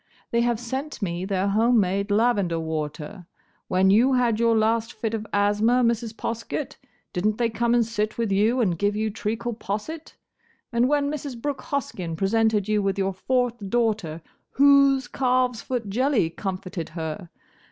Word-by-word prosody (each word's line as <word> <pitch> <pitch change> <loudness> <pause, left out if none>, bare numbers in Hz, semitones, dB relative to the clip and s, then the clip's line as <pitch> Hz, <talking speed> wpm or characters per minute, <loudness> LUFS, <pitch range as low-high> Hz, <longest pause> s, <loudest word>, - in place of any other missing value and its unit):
—they 235 - +2
have 235 -2 +1
sent 265 +5 -5
me 175 0 -2
their 195 0 0
home 225 +4 +3
made 200 +1 0
lavender 205 -6 +2
water. 160 +3 -5 0.4
When 190 +1 +3
you 245 +6 +4
had 240 -3 +2
your 230 -1 +3
last 225 +1 +1
fit 225 0 -3
of 220 -1 -3
asthma, 210 +5 +2
Mrs. 230 -1 0
Poskett, 230 +5 -4 0.4
did 180 -2 -2
n't 215 0 0
they 235 -2 +1
come 235 +1 +1
and 235 -1 +3
sit 215 -1 -2
with 230 -3 -1
you 220 +6 +2
and 175 -7 0
give 205 0 +1
you 215 0 -1
treacle 225 +3 -3
posset? 225 +10 -6 0.6
And 240 +2 +3
when 290 -1 +1
Mrs. 280 -5 -5
Brooke 280 +1 -3
Hoskyn 195 - -3
presented 210 +2 +1
you 215 -1 +2
with 195 0 -1
your 195 0 0
fourth 240 0 -1
daughter, 210 -9 -1 0.3
whose 275 -2 +4
calves 250 -2 +1
foot 245 -4 -3
jelly 235 - +1
comforted 185 -2 -5
her? 160 +2 -5
220 Hz, 165 wpm, -24 LUFS, 195-245 Hz, 0.6 s, you